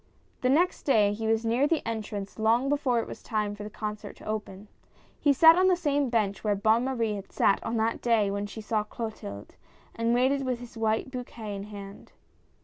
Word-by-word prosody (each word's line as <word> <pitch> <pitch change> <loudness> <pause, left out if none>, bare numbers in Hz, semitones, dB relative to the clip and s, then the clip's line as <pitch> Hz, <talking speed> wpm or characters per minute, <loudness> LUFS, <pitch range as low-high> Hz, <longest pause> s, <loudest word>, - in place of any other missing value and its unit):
The 255 - +2
next 340 +7 +2
day 210 -7 +3
he 220 +1 -3
was 225 +1 +1
near 240 +5 +2
the 320 -5 -1
entrance 210 -3 -5
long 230 +5 +2
before 280 -5 +1
it - - -3
was - - -9
time 210 -3 -2
for 205 - -9
the 210 - -6
concert 210 -1 -6
to - - -15
open. 210 -2 -5 0.5
He 290 - +4
sat 325 +4 +8
on 370 +1 +4
the 370 - +5
same 290 -5 0
bench 215 -4 0
where 210 -2 +1
Bonne 220 +4 +2
Marie 230 -5 0
had 200 -1 -7
sat 195 - +2
on 230 - -2
that 225 +1 0
day 220 -4 +2
when 200 +1 -2
she 220 +2 -8
saw 215 0 0
Clotilde, 210 - -7 0.4
and 230 +1 +1
waited 270 +3 +2
with 255 -2 -1
his 245 -1 -11
white 220 +3 0
bouquet 235 -5 -6
in 200 0 -6
his 210 - -13
hand. 200 0 -10
225 Hz, 215 wpm, -28 LUFS, 210-255 Hz, 0.5 s, sat